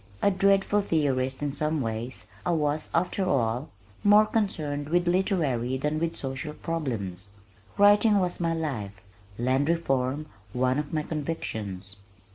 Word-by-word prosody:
A 200 - +5
dreadful 195 +1 +3
theorist 135 -6 0
in 145 - 0
some 155 +2 -1
ways, 115 0 -3 0.2
I 175 - +1
was, 150 -1 0
after 180 +3 0
all, 125 -1 0 0.3
more 210 +1 +7
concerned 155 -10 -1
with 175 +1 +2
literary 150 -9 +1
than 150 +3 -1
with 165 0 -1
social 135 +3 -4
problems. 110 - -3 0.5
Writing 205 +1 +6
was 180 -2 0
my 165 -1 0
life, 110 -12 -4 0.4
land 130 +5 +1
reform 140 -3 0 0.3
one 130 +2 +1
of 150 - -4
my 155 -1 -1
convictions. 105 - -4
150 Hz, 135 wpm, -27 LUFS, 130-170 Hz, 0.5 s, more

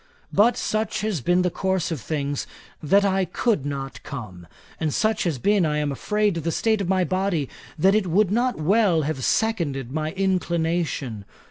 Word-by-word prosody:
But 220 +3 +4
such 215 +1 -1
has 210 -8 -1
been 175 +5 +2
the 180 - +1
course 190 -2 -1
of 155 -7 -3
things, 145 +1 -3 0.3
that 200 +7 +3
I 195 -1 +2
could 180 - 0
not 135 -3 -5
come; 105 -12 -8 0.3
and 155 -2 0
such 220 +6 +1
has 165 -6 0
been, 200 - +2
I 150 -2 +1
am 150 -1 0
afraid, 210 +8 0
the 165 +1 -2
state 220 +4 +1
of 185 - -2
my 190 -1 +3
body, 185 -5 0 0.3
that 190 +5 +4
it 210 -3 +2
would 190 +3 +2
not 245 +3 +1
well 180 0 +3
have 140 -3 -3
seconded 145 - 0
my 155 +2 -2
inclination. 170 - -1
175 Hz, 175 wpm, -24 LUFS, 145-200 Hz, 0.3 s, But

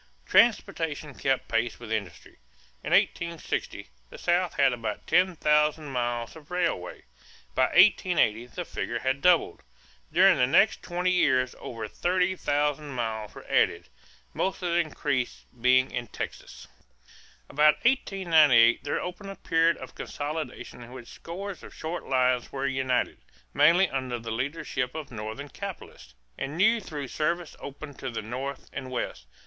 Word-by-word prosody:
Transportation 150 -2 +2
kept 135 0 -1
pace 115 +1 -1
with 115 -2 -9
industry. 100 - -5 0.4
In - - -4
1860, 170 - 0 0.2
the - - -11
South 175 0 +1
had 135 -2 +4
about 110 -3 -4
ten 185 0 +3
thousand 150 -1 +2
miles 120 -1 -2
of 150 -2 -14
railway. 170 - -2 0.5
By 130 - +3
1880 175 - +4
the 175 +7 -6
figure 120 - -3
had 130 +3 -1
doubled. 180 -2 +3 0.5
During - - +6
the 125 - +4
next 195 +10 +4
twenty 180 +1 -1
years 130 -8 +2
over 115 -2 -6
thirty 180 - 0
thousand 145 -2 -1
miles 110 -3 -3
were - - -11
added, - - +1 0.4
most 190 0 -2
of 175 - 0
the 170 - +3
increase 145 -6 -2 0.2
being 130 +1 +4
in 120 -1 -4
Texas. - - -7 0.8
About 150 +1 +4
1898 160 - +4
there 145 - -1
opened 180 +3 -6
a 195 - -7
period 165 -1 +2
of - - -10
consolidation 150 -4 -6
in 120 +1 -11
which 125 -3 -10
scores 190 +3 -7
of - - -12
short 160 +2 -5
lines 125 -2 +1
were 135 0 -3
united, 130 -1 0 0.3
mainly 170 +6 +5
under 130 -4 -3
the 115 -1 -6
leadership 130 +1 -3
of 155 -4 -6
Northern 110 +6 -6
capitalists, 180 - -9 0.2
and 140 +4 -4
new 220 +5 +4
through 145 -7 -6
service 170 +1 -2
opened 140 +1 -9
to 130 - -4
the 115 -2 -5
North 130 +5 -5
and 130 -2 -5
West. 120 - -4
145 Hz, 150 wpm, -27 LUFS, 125-170 Hz, 0.8 s, During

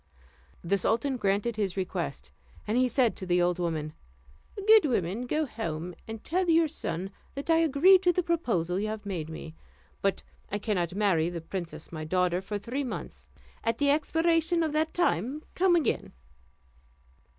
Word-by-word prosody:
The 195 +3 +1
sultan 235 +8 +1
granted 205 +2 0
his 195 -3 -1
request, 175 - -3 0.3
and 215 - -1
he 255 +1 +4
said 245 -1 +2
to 190 - -5
the 180 0 +3
old 175 0 +1
woman, 155 -3 -2 0.7
"Good 435 0 +8
woman, 230 - -1
go 305 +4 +1
home, 175 - -4
and 225 -1 -7
tell 360 +2 0
your 330 0 +5
son 190 - -4 0.2
that 280 +4 -2
I 325 - +5
agree 330 +4 +6
to 360 -1 +3
the 360 +1 0
proposal 195 - 0
you 215 - -1
have 215 -1 -5
made 170 -6 -4
me; 160 0 -8 0.5
but 195 -1 0 0.3
I 205 - 0
cannot 185 -5 -1
marry 185 -6 +2
the 175 -1 -5
princess 170 +1 -7
my 155 -2 -5
daughter 180 +2 +1
for 205 +2 -4
three 240 +7 -3
months; 255 - -7 0.3
at 230 0 0
the 285 +1 +3
expiration 330 +3 +2
of 310 -2 -1
that 315 +1 +1
time 270 - 0
come 360 -1 +4
again." 330 - 0
215 Hz, 170 wpm, -28 LUFS, -, 0.7 s, Good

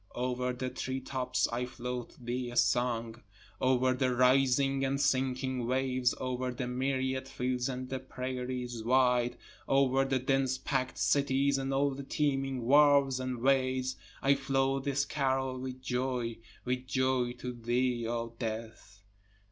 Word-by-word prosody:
Over 125 0 -1
the 125 +1 -4
treetops 130 -1 -1
I 125 +1 -2
float 125 -1 -5
thee 120 0 -3
a 120 - -8
song, 120 -2 +1 0.4
Over 130 0 +3
the 130 -1 0
rising 135 +2 +3
and 135 +1 0
sinking 130 -2 0
waves, 130 -1 +1
over 130 0 -2
the 125 0 -3
myriad 130 +1 -1
fields 125 -1 -2
and 130 0 -4
the 130 0 -3
prairies 125 -2 -4
wide, 125 0 +3 0.3
Over 135 -1 +3
the 135 -1 +1
dense 130 0 +1
packed 130 -1 -2
cities 135 +6 +2
and 135 0 -2
all 140 +1 +2
the 135 +1 -6
teeming 135 -3 -1
wharves 140 0 +5
and 130 -2 -3
ways, 130 -1 +2 0.3
I 140 - +5
float 135 0 0
this 140 0 +1
carol 130 -2 -1
with 130 0 -6
joy, 125 -2 -2 0.3
with 125 0 -2
joy 130 -2 +1
to 125 0 -6
thee 120 0 0
O 115 0 -3
death. 110 -3 -6
130 Hz, 140 wpm, -31 LUFS, 125-135 Hz, 0.4 s, wharves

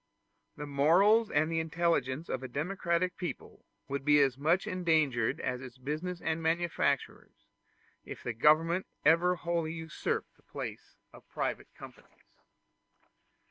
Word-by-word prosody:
The 150 - -5
morals 180 +11 +4
and 155 +2 +1
the 165 - +1
intelligence 160 -3 0
of 130 - -3
a 130 - -5
democratic 170 +5 -1
people 175 -8 -7 0.2
would 140 0 -3
be 150 +1 +5
as 135 -3 +3
much 160 +8 +1
endangered 160 - +1
as 125 0 -3
its 130 -1 -10
business 155 +7 -4
and 160 0 -1
manufactures, 165 +1 -1 0.6
if - - -9
the 120 - -3
government 160 +9 +3 0.2
ever 170 +3 +5
wholly 170 -2 -2
usurped 160 -2 -4
the - - -26
place - - -8 0.2
of - - -16
private - - -3
companies. - - -15
160 Hz, 135 wpm, -31 LUFS, 140-170 Hz, 0.6 s, be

